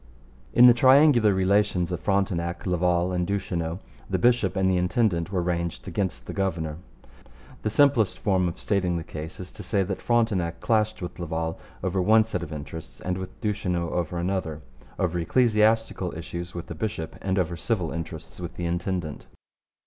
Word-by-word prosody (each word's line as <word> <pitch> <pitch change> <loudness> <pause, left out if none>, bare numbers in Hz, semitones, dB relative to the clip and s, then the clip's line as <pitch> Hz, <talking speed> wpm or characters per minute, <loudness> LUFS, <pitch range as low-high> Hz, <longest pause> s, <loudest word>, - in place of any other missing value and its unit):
In 125 - +7
the 125 - +9
triangular 130 -2 +6
relations 95 -2 +2
of 90 - -2
Frontenac, 85 -3 -1
Laval, 90 0 +1
and 90 -1 -1
Duchesneau 90 -4 -2 0.3
the 95 - +1
bishop 115 -1 +3
and 95 -1 +2
the 95 -1 +3
intendant 90 -2 +1
were 90 -3 0
ranged 85 0 -2
against 95 -1 -2
the - - -6
governor. 85 -6 -2 0.8
The 110 - -1
simplest 130 -4 +3
form 95 -3 +1
of 85 - -5
stating 90 -4 0
the 85 - -4
case 80 +1 -7
is 90 0 -7
to - - -10
say 100 -2 0
that 95 0 -4
Frontenac 100 -8 +1
clashed 110 -3 +1
with 90 - -6
Laval 80 -1 -3 0.2
over 95 0 0
one 110 +4 +5
set 110 - -4
of 75 - -6
interests 75 +2 -8
and 90 0 -2
with 95 0 -7
Duchesneau 90 -6 -1
over 85 0 -2
another; 85 -4 -2 0.3
over 90 -1 0
ecclesiastical 110 -3 +2
issues 85 +1 -6
with 85 - -5
the - - -7
bishop 80 -2 -4
and 95 0 -1
over 90 -2 0
civil 90 -1 -1
interests 80 0 -7
with 85 -1 -6
the 85 - -4
intendant. 85 -2 -3
90 Hz, 170 wpm, -26 LUFS, 85-100 Hz, 0.8 s, the